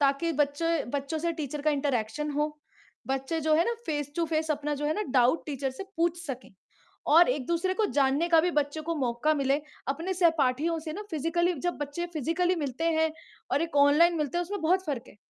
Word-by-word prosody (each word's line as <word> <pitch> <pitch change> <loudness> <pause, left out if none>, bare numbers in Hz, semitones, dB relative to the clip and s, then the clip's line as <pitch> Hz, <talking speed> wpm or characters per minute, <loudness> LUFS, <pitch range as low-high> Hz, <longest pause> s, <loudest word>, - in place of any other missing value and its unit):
ताकि 280 +4 +2
बच्चे 300 +2 0
बच्चों 285 +3 -2
से 335 +2 -1
टीचर 295 0 -4
का 305 - +3
इंटरेक्शन 280 0 -1
हो। 300 +1 -1 0.5
बच्चे 270 +5 -1
जो 310 0 +2
है 330 +2 +4
ना 470 - 0
फेस 290 -2 -2
टू 340 - +2
फेस 315 0 0
अपना 295 0 -1
जो 290 +1 -4
है 305 - +1
ना 425 - -1
डाउट, 255 +4 +3
टीचर 275 -2 -2
से 260 +9 -8
पूछ 340 +1 +1
सके 260 -3 -6 0.6
और 335 +3 +7
एक-दूसरे 340 +8 -1
को 435 +2 +1
जानने 280 +5 +2
का 330 -1 +6
भी 355 +2 +1
बच्चों 290 +2 -4
को 335 +2 -2
मौका 265 +2 +1
मिले 275 0 +1 0.3
,अपने 330 +7 -2
सहपाठियों 325 -2 +2
से 310 - -3
ना 410 - -5
फिजिकली 335 +3 +1 0.2
जब 350 - -2
बच्चे 290 +4 -3
फिजिकली 335 +5 +1
मिलते 275 +4 -3
हैं 320 0 +2 0.4
और 290 - +2
एक 330 -3 -3
ऑनलाइन 335 +4 +5
मिलते 300 +3 -1
हैं - - +1
उसमें 400 +3 -5
बहुत 370 +4 +2
फ़र्क 270 -5 -3
है। - - -16
305 Hz, 210 wpm, -28 LUFS, 280-335 Hz, 0.6 s, और